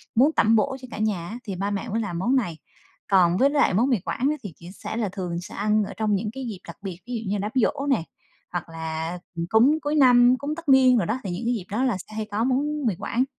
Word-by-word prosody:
muốn 270 +7 +5
tẩm 225 -5 +4
bổ 265 +5 +1
cho 255 - -9
cả - - -6
nhà 205 -6 -1
á, 230 - -6
thì 200 -5 -5
ba 200 +3 -2
mẹ 200 -1 -3
mới 225 +3 -1
làm 175 -6 -3
món 240 +8 +1
này. 180 -11 0 0.5
Còn 180 -3 +4
với 270 +6 +4
lại 285 -7 +2
món 235 +8 +2
Mì 245 -6 +2
Quảng 245 +8 -2
á, 305 - 0
thì 200 -5 -7
chỉ 170 - -12
sẽ 205 - -7
là 220 -4 -1
thường 180 -3 -4
sẽ - - -10
ăn 210 +1 +2
ở - - -6
trong 215 -2 +1
những 210 +2 -2
cái 265 0 -6
dịp 210 -5 -6
đặc 170 - -9
biệt, 185 -3 -6
ví 250 - -5
dụ 220 -4 -4
như 205 - 0
đám 205 +2 -3
giỗ 275 +3 +1
nè, 250 -11 +2 0.5
hoặc 175 -2 -4
là 160 +1 -4 0.3
cúng 260 +8 +4
cuối 295 +1 -1
năm, 250 -3 +6
cúng 290 +3 -4
tất 335 -2 -7
niên 260 -2 +6
đồ 205 - +1
đó, 220 +7 -1
thì 195 - -4
những 175 +7 -4
cái 240 - +1
dịp 210 -7 -4
đó 225 +5 0
là 245 -7 +1
sẽ 215 +4 -11
hay 215 0 -2
có 210 +2 0
món 285 +3 0
Mì 215 - +1
Quảng. 245 - 0
220 Hz, 285 wpm, -24 LUFS, 190-255 Hz, 0.5 s, năm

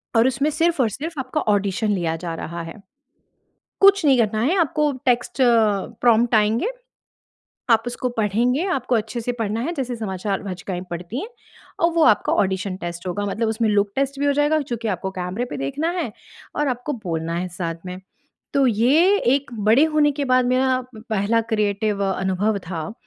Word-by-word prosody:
और 230 +2 +5
उसमें 275 +4 +1
सिर्फ़ 325 -1 +1
और 230 - +2
सिर्फ़ 305 - -6
आपका 265 +4 -2
ऑडिशन 205 +1 0
लिया 170 -4 0
जा 170 - -3
रहा 170 +1 -6
है। 165 - -8 1.1
कुछ 390 -4 +6
नहीं 270 -3 +5
करना 215 -1 +1
है 315 +10 +2
आपको 300 -2 +1
टेक्स्ट 245 +1 +1
प्रॉम्प्ट 230 0 +3
आएँगे। 220 - +2 1.0
आप 225 -1 +5
उसको 245 +1 -2
पढ़ेंगे 240 - +1
आपको 255 -3 -1
अच्छे 220 +2 -3
से 245 +2 -2
पढ़ना 225 0 -1
है 325 +8 -2
जैसे 255 -4 -3
समाचार 200 -2 -3
वाचिकाएँ 185 -1 -5
पढ़ती 175 +9 -5
हैं 425 - -6 0.5
और 335 - +4
वो 330 - +2
आपका 210 - +3
ऑडिशन 190 0 0
टेस्ट 175 +1 -6
होगा। 205 +3 -2
मतलब 220 +3 -1
उसमें 220 0 0
लुक 205 -1 +2
टेस्ट 275 0 -1
भी 285 - +1
हो 285 - +4
जाएगा 295 +2 +2
और 305 - +1
चूँकि 235 -4 -4
आपको 190 -1 -2
कैमरे 185 +5 -3
पे 250 - -6
देखना 290 - -2
है 245 -11 -3 0.4
और 295 -1 +1
आपको 250 +4 -3
बोलना 165 -1 -2
है 180 +1 -2
साथ 170 -1 -4
में। 180 +1 -6 0.5
तो 275 -2 +4
ये 280 - +4 0.2
एक 280 -2 -2
बड़े 225 +9 +5
होने 305 -2 +2
के 285 0 -2
बाद 255 0 +3
मेरा 255 +1 +2
पहला 220 0 0
क्रिएटिव 210 -1 0
अनुभव 190 +2 0
था। 165 +1 -4
225 Hz, 180 wpm, -22 LUFS, 195-270 Hz, 1.1 s, कुछ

